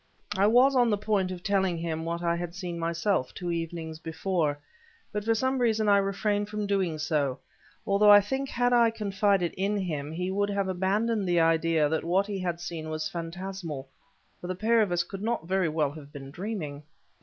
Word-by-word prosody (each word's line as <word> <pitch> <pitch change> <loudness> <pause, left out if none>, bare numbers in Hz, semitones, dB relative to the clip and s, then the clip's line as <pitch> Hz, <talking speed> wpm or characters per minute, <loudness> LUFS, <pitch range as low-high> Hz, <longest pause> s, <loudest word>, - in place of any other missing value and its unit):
I 200 +1 +4
was 255 +5 +5
on 245 -2 +4
the 210 - +2
point 200 -3 0
of 180 -1 -7
telling 190 -3 +1
him 165 -1 -3
what 170 +1 -3
I 170 0 +1
had 175 0 -5
seen 175 -3 -5
myself, 170 -3 -1
two 175 -2 -3
evenings 165 -1 -4
before, 160 -2 -1 0.5
but 210 0 -3
for 225 +1 +2
some 260 +3 0
reason 220 -3 +2
I 200 -1 +6
refrained 205 +1 -1
from 210 0 -3
doing 190 -5 0
so, 150 -4 0 0.5
although 200 +1 +4
I 205 0 +10
think 265 +7 -2
had 245 0 +1
I 235 -1 +5
confided 200 -4 0
in 200 +2 0
him 155 -6 -3
he 180 +3 -3
would 205 +1 0
have 200 -1 -1
abandoned 195 +3 0
the 175 -1 +3
idea 165 -1 +3
that 160 +1 -1
what 185 +4 +2
he 200 -2 -4
had 175 -2 -2
seen 165 -2 -5
was 155 0 -3
phantasmal; 170 -4 -6 0.5
for 175 - -6
the 185 - -2
pair 225 +4 +3
of 205 -4 +1
us 175 -1 +2
could 195 +3 -8
not 225 -5 -1
very 185 -2 +1
well 150 -2 0
have 145 -1 -11
been 135 -2 -9
dreaming. 170 -6 -5
185 Hz, 200 wpm, -28 LUFS, 165-205 Hz, 0.5 s, I